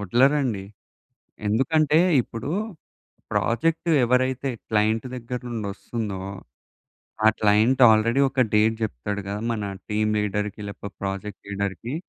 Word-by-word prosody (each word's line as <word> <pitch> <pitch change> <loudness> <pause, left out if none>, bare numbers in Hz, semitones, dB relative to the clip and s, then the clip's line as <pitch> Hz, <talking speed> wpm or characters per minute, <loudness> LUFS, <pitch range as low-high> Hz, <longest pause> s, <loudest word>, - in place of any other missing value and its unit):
వదలరండి. 120 0 +2 0.8
ఎందుకంటే, 150 +8 +3 0.2
ఇప్పుడు 115 +5 -6 0.8
ప్రాజెక్టు 165 +8 +1
ఎవరైతే 130 +2 +1 0.2
క్లైంట్ 110 +3 +1
దగ్గర 125 +1 -5
నుండి 110 -3 -3
వస్తుందో. 110 -6 -5 1.1
ఆ - - +9
క్లైంట్ 110 +5 +3
ఆల్రెడీ 115 +4 +3
ఒక 130 0 -1
డేట్ 110 +1 +4
జెప్తాడు 105 - -3
గదా! 100 +1 -3
మన 105 -3 -3 0.3
టీమ్ 105 0 +1
లీడర్‌కి 105 0 -2
లేకపోతే, 100 -1 -8
ప్రాజెక్ట్ 100 +1 -4
లీడర్‌కి. 100 +5 -3
110 Hz, 110 wpm, -24 LUFS, 105-130 Hz, 1.1 s, ఆ